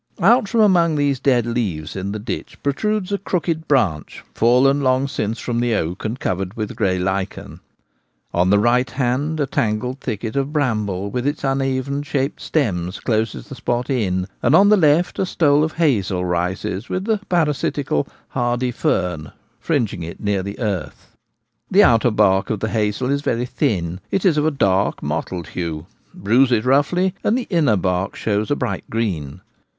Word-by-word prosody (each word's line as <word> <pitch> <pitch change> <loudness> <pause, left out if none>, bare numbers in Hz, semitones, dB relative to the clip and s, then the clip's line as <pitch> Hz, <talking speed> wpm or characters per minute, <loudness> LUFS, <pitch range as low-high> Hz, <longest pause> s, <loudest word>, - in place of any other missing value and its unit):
Oct 215 +4 +4
from 225 +2 +2
amef^r 175 -6 +4
these 140 -2 +1
dead 125 -4 +2
leaves 100 -11 -3
in 95 +1 -3
the 105 - -3
ditch 110 +3 -6
protrudes 205 +7 -1
a 200 - 0
crooked 165 -4 -2
branch 100 - 0
fallen 130 +5 +3
long 130 0 +2
since 115 -4 -3
from 120 -1 -2
the 120 -2 +1
oak, 85 0 -3
and 110 +4 -3
covered 95 +2 -2
with 105 -2 -4
grey 95 -4 +1
lichen. 95 +1 -3 0.7
On 90 +2 +2
the 100 - +5
right 120 +3 +2
hand 135 +5 -1
a 145 - +2
tangled 125 +2 -1
thicket 110 -3 -4
of 140 +1 -1
bramble 105 - -1
with 125 +2 -2
its 145 - -2
uneven 135 0 -1
shaped 140 -1 -2
stems 95 - -1
closes 110 - -1
the - - -9
spot 120 +2 -2
in. 95 -7 0
and 150 - +4
on 200 +4 +6
the 210 - +7
left 165 -1 +2
a 195 - +2
stole 150 -4 +3
of 155 0 -1
hazel 100 - +1
rises 90 +4 -2
with 185 +1 -2
the 220 -2 +1
parasitical 150 - 0 0.2
*hardy 120 0 -1
fern 90 - -1 0.2
' - - -40
fring 140 -10 0
ing 90 - -6
it 85 0 -7
near 100 -2 0
the 100 +2 -6
earth. 100 -9 -4 0.5
The 200 +2 +6
outer 120 - +4
bark 105 -2 +2
of 110 - -1
the 110 - -2
hazel 110 +4 0
is 140 0 0
very 120 -3 -1
thin; 90 -7 -1
it 195 - -1
is 175 -5 +4
of 150 0 +2
a - - +5
dark 100 -9 +1
mottled 80 +3 -3
hue; 80 -3 -4 0.3
bruise 120 +6 +2
it 115 -1 +2
roughly, 160 +8 +2
and 225 - +2
the 255 - -3
inner 150 - +3
bark 90 +1 -1
shows 105 0 -1
a 145 - +2
bright 100 -7 -4
green. 90 -12 -3
120 Hz, 180 wpm, -20 LUFS, 100-145 Hz, 0.7 s, the